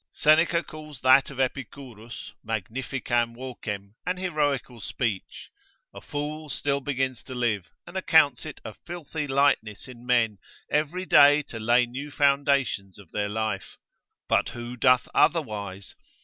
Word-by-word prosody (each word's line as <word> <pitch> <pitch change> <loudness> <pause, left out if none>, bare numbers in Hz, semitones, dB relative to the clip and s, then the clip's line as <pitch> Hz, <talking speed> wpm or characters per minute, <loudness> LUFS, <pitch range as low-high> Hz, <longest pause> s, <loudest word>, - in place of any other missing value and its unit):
Seneca 165 +3 +3
calls 155 -4 -11
that 130 +1 +6
of 135 - -9
Epicurus, 125 -3 -5
magnificam 120 +2 -2
vocem, 105 -6 -6
an 180 +1 -2
heroical 145 -9 -1
speech, 110 -1 -4 0.4
A - - -10
fool 150 +1 -5
still 140 0 -1
begins 130 -2 -2
to 130 - -7
live, 110 -7 -1 0.2
and - - -12
accounts - - +4
it - - -8
a - - -6
filthy 160 -3 -6
lightness 135 -6 +1
in 120 -2 -12
men, 115 -5 +2 0.3
every 155 +5 0
day 145 -2 +7
to 115 - -8
lay 120 +3 +4
new 130 +5 -7
foundations 140 -8 +1
of 100 -5 -15
their 100 -1 -1
life, 110 -2 -3 0.5
but - - +2
who 120 +1 -7
doth 125 0 +4
otherwise? 100 - 0
130 Hz, 135 wpm, -26 LUFS, 115-145 Hz, 0.5 s, day